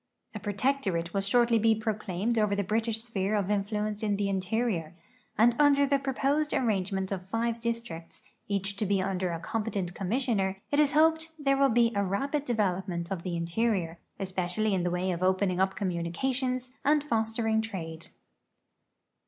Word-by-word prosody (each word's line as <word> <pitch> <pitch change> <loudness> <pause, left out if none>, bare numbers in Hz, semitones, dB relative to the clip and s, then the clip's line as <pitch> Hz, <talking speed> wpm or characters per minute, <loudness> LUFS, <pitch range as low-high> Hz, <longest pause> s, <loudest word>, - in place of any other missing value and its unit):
A 215 - -5
protectorate 200 -5 -1
will 195 - +1
shortly 235 +3 +3
be 220 +1 +4
proclaimed 215 0 -1
over 210 -1 +2
the 200 - 0
British 220 +3 -1
sphere 215 -3 -1
of 205 -1 0
influence 210 +1 -1
in 210 -2 +1
the 200 0 -1
interior, 190 -3 -1 0.4
and 235 +3 +5
under 285 -1 +5
the 280 0 +2
proposed 280 +2 0
ar 255 - +1
rangement 195 -2 -1
of 190 -1 -4
five 230 +2 -1
districts, 230 -8 -5 0.2
each 200 0 -2
to 210 - -1
be 200 0 +2
under 185 -1 -1
a 165 - -3
competent 200 -1 -3
com 185 0 -4
missioner, 210 -6 0
it 290 - +2
is 300 -1 +4
hoped 320 +1 +3
there 275 -2 +2
will 275 0 +4
be 235 0 +4
a 200 -1 +1
rapid 275 +10 -1
development 190 -6 -1
of 190 -3 -2
the 175 -1 -3
interior, 170 -1 -1 0.2
especially 190 +2 -1
in 185 - +1
the 175 - 0
way 180 +1 -1
of 175 0 -3
opening 185 0 +2
up 190 0 +2
communications 250 +8 -1
and 295 +1 +3
fostering 225 -3 0
trade. 165 -7 -6
210 Hz, 170 wpm, -29 LUFS, 185-235 Hz, 0.4 s, and